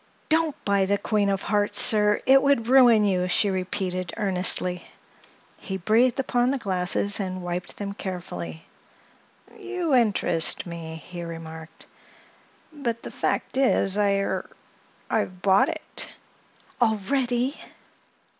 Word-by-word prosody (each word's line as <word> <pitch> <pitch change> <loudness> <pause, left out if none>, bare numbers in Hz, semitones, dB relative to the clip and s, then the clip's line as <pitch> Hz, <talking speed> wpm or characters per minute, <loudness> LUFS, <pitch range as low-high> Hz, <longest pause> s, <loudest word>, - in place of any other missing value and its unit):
"Don't 320 -1 +2
buy 200 -1 +2
the 200 +1 +1
Queen 205 -1 0
of 195 0 -1
Hearts, 205 -1 0
sir; 210 -1 +4
it 270 +1 +6
would 280 -5 +2
ruin 240 -4 +6
you," 180 -2 +1
she 200 +2 +3
repeated 185 -1 -3
earnestly. 180 -2 +1 0.8
He 190 -2 -5
breathed 230 +8 +2
upon 245 -2 +1
the 275 - 0
glasses 195 -1 0
and 185 -2 -4
wiped 175 0 -4
them 200 -1 -5
carefully. 180 -4 -7 0.9
"You 370 -6 -3
interest 205 -9 +2
me," 165 -2 -7
he 175 +2 -9
remarked. 165 -1 -9 0.9
"But, 235 -6 -4
the - - -7
fact - - -2
is, 250 -7 +2
I—er—I've 195 -2 -3
bought 200 +9 +4
it." 315 -1 -5 0.7
"Already!" 245 +4 0
200 Hz, 115 wpm, -25 LUFS, 185-245 Hz, 0.9 s, it